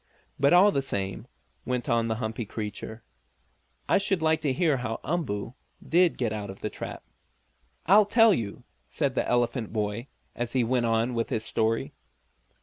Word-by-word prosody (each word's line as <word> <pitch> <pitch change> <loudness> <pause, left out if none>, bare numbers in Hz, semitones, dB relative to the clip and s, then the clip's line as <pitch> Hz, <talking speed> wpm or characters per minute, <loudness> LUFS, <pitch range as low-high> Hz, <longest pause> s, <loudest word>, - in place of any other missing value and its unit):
"But, 140 +1 +4
all 185 +4 +7
the 140 - 0
same," 100 -4 -4 0.4
went 125 -2 -2
on 115 -1 +2
the 110 - -1
humpy 110 0 -3
creature, 110 +1 -6 0.8
"I - - +4
should 195 -2 +1
like 160 0 +2
to 145 -3 +1
hear 155 -1 +2
how 115 -2 -3
Umboo 125 -10 -2 0.3
did 175 +1 +3
get 115 -4 -1
out 105 -2 -5
of 95 - -9
the - - -3
trap." - - -7 0.8
"I'll 205 +5 +6
tell 225 0 +6
you," 110 - -4 0.2
said - - -2
the - - -1
elephant 120 -1 0
boy, 105 +3 -2 0.3
and 120 -1 -3
he 125 0 +1
went 120 0 +1
on 115 +2 +1
with 115 -1 -1
his 110 0 -1
story. 115 0 0
120 Hz, 170 wpm, -27 LUFS, 110-155 Hz, 0.8 s, all